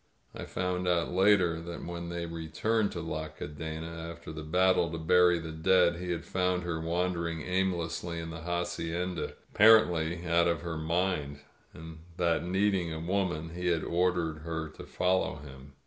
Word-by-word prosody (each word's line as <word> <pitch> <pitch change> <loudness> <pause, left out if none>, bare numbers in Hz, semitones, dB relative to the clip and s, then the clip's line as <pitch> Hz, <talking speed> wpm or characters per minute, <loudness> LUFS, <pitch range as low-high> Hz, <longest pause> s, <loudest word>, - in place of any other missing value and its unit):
'' - - -41
I - - -6
found 90 0 -2
out 85 -1 +1
later 90 -3 +3
that 85 0 -7
when 85 0 -5
they 85 0 -3
returned 85 +7 -1
to 85 - -4
La 80 -1 -4
Cadena 80 +2 -6
after 85 -2 -9
the 80 0 -6
battle 90 +1 +2
to 80 - -3
bury 90 +2 +4
the 80 -1 -6
dead 85 +1 +3
he 90 +1 -5
had 85 -2 -2
found 90 -1 0
her 85 -2 -3
wandering 85 -1 -1
aimlessly 85 -2 -1
in 80 0 -5
the 85 0 -7
hacienda, 85 0 -2
ap - - -23 0.2
parently 90 -6 +5
out 85 0 +3
of 85 -1 0
her 80 -2 -4
mind; 80 -3 -1 0.3
and 80 0 -10 0.2
that, 85 -2 +1
needing 95 -1 +1
a 80 - -4
woman, 85 -2 -1
he 90 +1 -3
had 85 -2 +1
ordered 85 -2 0
her 80 0 -4
to - - -11
follow 90 -3 +1
him. 70 -1 -12
85 Hz, 175 wpm, -30 LUFS, 80-90 Hz, 0.3 s, parently